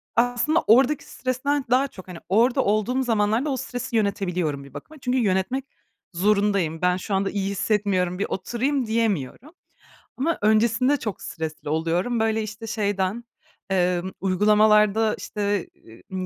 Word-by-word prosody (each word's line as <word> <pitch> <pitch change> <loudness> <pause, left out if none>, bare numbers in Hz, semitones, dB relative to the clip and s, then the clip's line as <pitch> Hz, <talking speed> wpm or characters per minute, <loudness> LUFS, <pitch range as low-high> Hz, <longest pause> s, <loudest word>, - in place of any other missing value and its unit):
aslında 245 +7 +2
oradaki 260 +6 +4
stresten 265 +2 -2
daha 260 +3 +3
çok 185 -7 -13
Hani 180 - -8
orada 235 +6 +3
olduğum 215 +6 +1
zamanlarda 225 +3 +1
o 270 - -1
stresi 245 -1 -5
yönetebiliyorum 180 -8 -1
bir 140 - -15
bakıma. 310 0 -10
Çünkü 250 +1 0
yönetmek 225 +4 0 0.5
zorundayım. 200 -3 +1
Ben 180 0 +2
şu 195 +2 -5
anda 195 0 0
iyi 195 -1 -2
hissetmiyorum, 195 -3 0
bir 200 - 0
oturayım, 245 +8 -1
diyemiyorum. 220 - -1 0.7
Ama 320 +5 0
öncesinde 225 +6 +3
çok 215 -6 -5
stresli 160 -2 -6
oluyorum. 170 +9 0
Böyle, 220 0 +1
işte, 215 +2 -7
şeyden, 205 0 -1 0.5
emm, 180 -1 0
uygulamalarda, 210 +2 +3
işte, 205 -3 -2 0.4
ııı, 185 0 -3
210 Hz, 135 wpm, -24 LUFS, 190-245 Hz, 0.7 s, oradaki